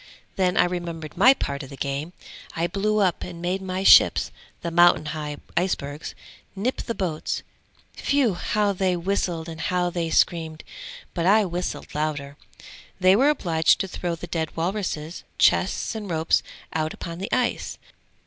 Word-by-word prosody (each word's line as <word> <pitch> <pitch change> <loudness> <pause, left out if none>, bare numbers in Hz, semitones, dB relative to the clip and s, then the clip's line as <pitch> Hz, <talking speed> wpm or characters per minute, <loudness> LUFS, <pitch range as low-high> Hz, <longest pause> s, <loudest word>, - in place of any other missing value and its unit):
Then 185 -2 +1
I - - +6
remembered 170 -3 -5
my 255 +9 +7
part 140 - -3
of 135 - -9
the 140 - -10
game! 140 +5 -3 0.4
I 165 - 0
blew 205 +4 0
up 190 -4 +1
and 175 -2 -8
made 180 +2 -1
my 190 0 -3
ships, - - +6 0.3
the 170 - -3
mountain 175 -2 +5
high 150 -2 -5 0.2
icebergs, 150 -5 -2 0.4
nip 230 +7 -1
the 230 - -4
boats; 165 -5 -2 0.6
whew! 275 -7 +3
how 205 +3 0
they 185 -1 0
whistled 175 -2 -1
and 160 -1 -7
how 180 -1 0
they 170 -1 -2
screamed, 160 -1 +1 0.5
but 170 0 0
I 210 +2 +5
whistled 175 0 -4
louder. 145 -2 -2 0.6
They 185 +1 +6
were 270 +7 +4
obliged 165 - +2
to 195 - -2
throw 175 -2 -3
the 165 - -8
dead 165 -2 -3
walruses, 170 -2 -3
chests - - +2
and 215 -3 -6
ropes 160 -1 +2 0.3
out 155 0 -1
upon 170 0 -7
the 195 - -5
ice! 250 -1 -1
175 Hz, 160 wpm, -24 LUFS, 160-195 Hz, 0.6 s, my